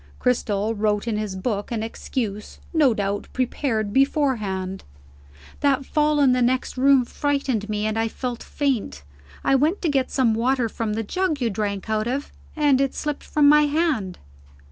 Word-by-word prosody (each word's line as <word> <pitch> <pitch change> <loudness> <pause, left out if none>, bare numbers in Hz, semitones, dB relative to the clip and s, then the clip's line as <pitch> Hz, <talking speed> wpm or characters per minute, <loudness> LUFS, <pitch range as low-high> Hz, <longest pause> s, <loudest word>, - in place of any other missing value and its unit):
Cristel 220 -3 0
wrote 210 0 0
in 225 - 0
his 210 -3 -3
book 205 +2 -3
an 225 -2 -2
excuse, 220 -2 -5
no 300 -6 +4
doubt 200 0 -2
prepared 230 -4 -1
beforehand: 215 -9 0 0.8
"That 275 -1 +1
fall 300 0 +1
in 275 -3 +5
the 250 0 +2
next 255 +1 0
room 265 -1 +4
frightened 270 -7 -1
me, 210 0 -1
and 215 +1 -1
I 225 - +1
felt 245 +1 -5
faint. 245 - -2 0.4
I - - +2
went 305 +9 +2
to 335 - +2
get 270 -3 +1
some 250 -4 +2
water 245 +2 +1
from 220 -1 -3
the 225 +1 -2
jug 355 - -1
you 235 -3 0
drank 200 0 -3
out 215 0 0
of, 270 +4 -3 0.2
and 290 -4 +3
it 275 -1 0
slipped 295 -1 -3
from 295 -1 +3
my 300 0 +6
hand." 290 - 0
245 Hz, 170 wpm, -23 LUFS, 215-280 Hz, 0.8 s, my